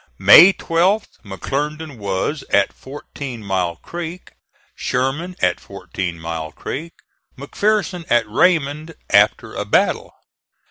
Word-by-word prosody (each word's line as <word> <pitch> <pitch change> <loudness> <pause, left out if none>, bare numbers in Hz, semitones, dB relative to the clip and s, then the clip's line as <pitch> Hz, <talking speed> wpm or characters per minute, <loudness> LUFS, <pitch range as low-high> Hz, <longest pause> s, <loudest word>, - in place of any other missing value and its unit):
May 180 +5 +9
12th, 185 +4 0
McClernand 145 - -4
was 100 +9 -2
at 100 -1 +3
Fourteen 135 -3 -9
Mile 95 -4 -1
Creek; 175 - -8 0.4
Sherman 140 +8 -2
at - - +2
Fourteen 85 -3 -6
Mile 80 -1 -5
Creek; 165 - -6 0.4
McPherson 180 +4 -1
at 120 -2 +3
Raymond 155 +4 +1 0.2
after 105 0 +3
a - - -3
battle. - - +1
140 Hz, 105 wpm, -19 LUFS, 100-165 Hz, 0.4 s, May